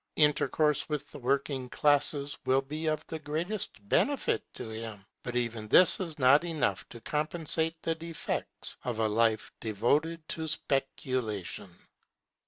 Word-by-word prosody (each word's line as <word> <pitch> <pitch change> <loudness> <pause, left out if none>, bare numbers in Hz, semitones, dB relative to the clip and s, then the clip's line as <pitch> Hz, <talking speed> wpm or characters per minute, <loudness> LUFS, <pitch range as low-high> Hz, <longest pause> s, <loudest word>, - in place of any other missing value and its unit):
Intercourse 150 0 +3
with 145 -1 -3
the - - -9
working 135 0 0
classes 145 0 +2
will 135 +1 +3
be 155 +4 -4
of 155 0 0
the 160 - -5
greatest 155 - -3
benefit 275 - +2
to - - -6
him; 110 -3 -7 0.2
but 125 - -5
even 115 -3 -1
this 180 +10 +6
is 170 -5 -3
not 140 +3 +6
enough 155 - -1
to 120 - -9
compensate 160 +3 0
the 165 - +1
defects 165 0 -4
of 125 -3 -2
a 110 -1 +2
life 110 0 +2
devoted 145 +10 0
to 160 -1 -2
speculation. 130 - -2
145 Hz, 140 wpm, -30 LUFS, 115-160 Hz, 0.2 s, this